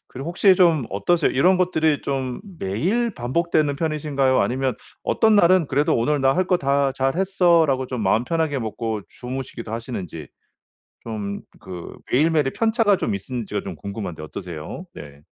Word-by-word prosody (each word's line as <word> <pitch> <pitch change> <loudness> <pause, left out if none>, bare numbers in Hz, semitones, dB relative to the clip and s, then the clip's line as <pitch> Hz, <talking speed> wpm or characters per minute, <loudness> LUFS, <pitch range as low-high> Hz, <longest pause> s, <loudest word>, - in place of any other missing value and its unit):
그리고 135 +5 -7
혹시 190 +2 +5
좀 165 -8 +4
어떠세요? 145 - +1
이런 180 +8 +4
것들이 160 -5 +1
좀 130 -2 -3 0.2
매일 185 - -1
반복되는 150 +3 0
편이신가요? 145 -4 +1
아니면 130 -1 0 0.3
어떤 220 -2 +3
날은 185 -4 +5
그래도 145 +2 +2
'오늘 140 +5 +1
나 135 0 +4
할 185 0 +1
거 180 - +4
다 140 -1 +1
잘 135 +3 -1
했어.' 180 -3 +3
라고 130 -1 0
좀 125 -3 -4
마음 110 +5 +2
편하게 160 -2 0
먹고 110 -1 -3
주무시기도 125 -3 -7
하시는지, 95 - -6 0.8
좀 105 -3 -5 0.2
그 90 -2 -8 0.2
매일매일의 150 0 +2
편차가 220 -3 +2
좀 100 - -1
있으신지가 115 +2 -4
좀 - - -6
궁금한데 100 -5 -6
어떠세요? 85 - -7
네. 70 0 -11
135 Hz, 355 characters per minute, -22 LUFS, 115-170 Hz, 0.8 s, 혹시